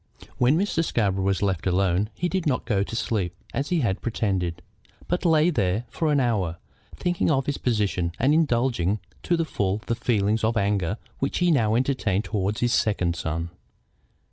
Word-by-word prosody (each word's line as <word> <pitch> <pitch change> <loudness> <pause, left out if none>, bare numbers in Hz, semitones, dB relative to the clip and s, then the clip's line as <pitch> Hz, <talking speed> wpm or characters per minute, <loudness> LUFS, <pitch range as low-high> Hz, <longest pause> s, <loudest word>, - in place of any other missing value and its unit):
When 125 +5 +4
Mr. 185 -3 +1
Scarborough 100 - 0
was 95 +1 +1
left 95 -3 0
alone 95 +2 +1
he 175 - -1
did 180 -2 -1
not 130 -3 0
go 105 -5 +1
to 100 - -3
sleep, 100 -6 -1 0.2
as 140 - -2
he 175 -3 +1
had 100 -5 0
pretended, 95 -7 -1 0.4
but 175 +1 -1
lay 160 +1 +4
there 105 - 0
for 160 -2 0
an 145 - +3
hour, 100 -10 0 0.4
thinking 175 -1 0
of 135 -4 +2
his 145 - -2
position 100 -7 0
and 135 +4 +3
indulging 120 - +1 0.2
to 175 - +1
the 165 - 0
full 100 -7 -1
the 115 - 0
feelings 110 -2 +1
of 110 +1 +1
anger 100 -1 0 0.2
which 135 - -1
he 180 -1 +3
now 110 -7 +3
entertained 120 -6 +1
toward 105 0 -1
his 120 -1 +1
second 90 -5 +1
son. 80 +1 -3
110 Hz, 180 wpm, -25 LUFS, 95-140 Hz, 0.4 s, When